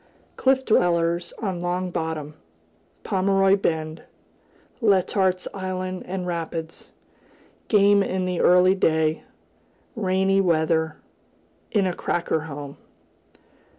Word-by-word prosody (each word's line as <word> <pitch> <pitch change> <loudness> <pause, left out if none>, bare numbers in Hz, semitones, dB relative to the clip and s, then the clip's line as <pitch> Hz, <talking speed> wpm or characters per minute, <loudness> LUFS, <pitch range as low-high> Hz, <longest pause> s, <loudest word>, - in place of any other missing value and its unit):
Cliff 265 0 +2
dwellers 170 -3 +1
on 190 -4 -2
Long 180 +1 -2
Bottom 160 -3 -4 0.7
Pomeroy 195 0 +3
Bend 160 -4 -2 0.8
Letart's 190 -3 +2
Island 185 -1 -4
and 185 0 -4
Rapids 165 -1 -5 0.8
Game 205 -1 +5
in 185 -1 -1
the 180 -1 -1
early 180 +1 +5
day 160 -4 +1 0.7
Rainy 195 -2 +2
weather 160 -3 +1 0.7
In 205 -3 +1
a 185 - 0
"cracker" 170 -2 -1
home. 145 -2 -8
180 Hz, 95 wpm, -24 LUFS, 165-190 Hz, 0.8 s, Game